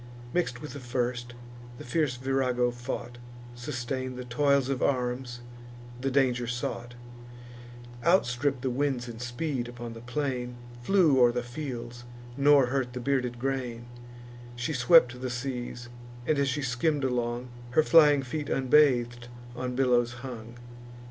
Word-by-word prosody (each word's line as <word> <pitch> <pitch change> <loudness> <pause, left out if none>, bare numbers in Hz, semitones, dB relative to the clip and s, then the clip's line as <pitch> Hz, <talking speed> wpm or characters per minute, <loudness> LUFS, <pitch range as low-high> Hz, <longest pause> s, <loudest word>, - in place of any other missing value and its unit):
Mix'd 175 -9 0
with 150 +5 -8
the 140 - -7
first, 120 -1 -3 0.4
the - - -9
fierce 145 0 0
Virago 125 -1 +1
fought, 120 0 -6 0.3
Sustain'd 130 0 -4
the 125 - -6
toils 140 +2 +2
of 135 -1 -2
arms, 125 -2 -1 0.6
the 135 +2 -1
danger 125 -3 +2
sought, 120 0 -4 1.1
Outstripp'd 140 -6 +2
the 130 - 0
winds 130 -2 -1
in 115 -1 -8
speed 125 +1 -3
upon 120 -1 -7
the 115 - -10
plain, 125 -1 -3 0.3
Flew 160 -2 +4
o'er 120 -1 +6
the 120 0 -2
fields, 120 -2 -6 0.3
nor 140 0 +5
hurt 125 -1 -1
the 125 - -4
bearded 125 -2 0
grain: 125 -2 -3 0.7
She 125 +6 -2
swept 125 -2 +5
the 130 - -2
seas, 125 -1 -4 0.4
and, 150 +1 +2
as 140 -1 +2
she 145 +2 -2
skimm'd 140 +4 0
along, 120 -1 -1 0.3
Her 155 - +7
flying 150 -4 +6
feet 145 +3 -4
unbath'd 125 -4 +3 0.3
on 125 0 -3
billows 120 -2 +2
hung. 120 -2 -8
125 Hz, 140 wpm, -28 LUFS, 120-140 Hz, 1.1 s, Her